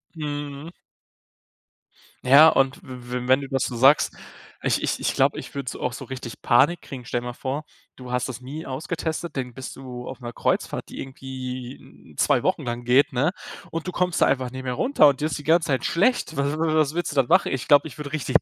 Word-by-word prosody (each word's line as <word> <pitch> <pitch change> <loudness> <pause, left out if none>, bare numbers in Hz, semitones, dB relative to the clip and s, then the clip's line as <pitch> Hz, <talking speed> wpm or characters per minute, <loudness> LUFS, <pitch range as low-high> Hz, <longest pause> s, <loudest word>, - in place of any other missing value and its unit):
Mhm. 145 0 -5 1.5
Ja, 140 +5 +8
und 135 0 +1
w 125 -1 -9
w 125 - -6
wenn 130 +2 +5
du 135 - -6
das 135 -1 0
so 125 - -3
sagst, 135 +5 +5 0.5
ich - - 0
ich - - -1
ich - - 0
glaube, - - +2
ich - - -10
würde 140 -3 -3
so - - -9
auch 125 - -2
so 135 - -7
richtig 125 -2 -8
Panik 145 +8 +4
kriegen. 130 -3 -9
Stell 120 +1 -2
dir 125 - -6
mal 120 - -4
vor, 135 +5 -4 0.3
du 125 -1 -9
hast 125 +1 0
das 130 0 -7
nie 145 +6 -7
ausgetestet, 160 +3 -4
dann 125 -2 -3
bist 130 +1 -8
du 125 -2 -8
auf 130 - -7
'ner 120 -2 -7
Kreuzfahrt, - - -1
die - - -9
irgendwie 130 -1 -8
2 - - +3
Wochen - - 0
lang 120 0 -4
geht, 130 +3 +3
ne, 140 +8 +2 0.4
und 165 +2 -4
du - - -2
kommst 180 -1 0
da - - +7
einfach 130 -2 0
nicht 130 0 -7
mehr 125 -1 -2
runter 155 - +4
und 140 0 +1
dir - - +1
ist 155 - -3
die 145 - -9
ganze 165 0 +3
Zeit 130 -4 0
schlecht. 195 -3 +1
Was 140 +2 0
wa 160 -1 +1
was 155 -1 +2
willst 175 0 -2
du - - -11
dann 135 -3 +3
machen? - - +3
Ich 130 - -3
glaube, 145 +1 +6
ich 135 - -12
würde 145 -2 -6
richtig 150 -5 +1
135 Hz, 230 wpm, -24 LUFS, 125-150 Hz, 1.5 s, Ja